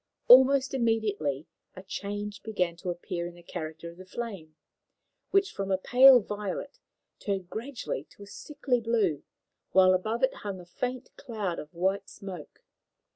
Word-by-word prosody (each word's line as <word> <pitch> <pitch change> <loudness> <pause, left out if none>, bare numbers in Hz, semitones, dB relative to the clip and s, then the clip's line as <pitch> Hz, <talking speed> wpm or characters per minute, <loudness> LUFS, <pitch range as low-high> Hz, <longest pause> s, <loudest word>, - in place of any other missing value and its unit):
Almost 265 +2 +7
immediately 210 - 0 0.3
a 185 - -10
change 205 +1 -5
began 180 -6 -1
to 180 +1 -5
appear 175 0 -4
in 175 - -10
the 175 - -16
character 160 -1 -7
of 170 - -18
the 185 - -11
flame, 190 -8 -7 0.7
which 395 0 +2
from 195 0 -4
a 190 - +3
pale 255 +6 +7
violet 205 +6 -5 0.4
turned 195 -3 -3
gradually 225 - -5
to 205 - -15
a - - -10
sickly 250 +3 -2
blue, 215 -10 +1 0.5
while 185 -1 +6
above 220 +6 -1
it 260 - +3
hung 200 -2 -5
a 175 - -11
faint 250 +8 -5
cloud 215 -9 -4
of 150 - -9
white 190 +3 -1
smoke. 190 -7 -10
200 Hz, 155 wpm, -28 LUFS, 175-235 Hz, 0.7 s, Almost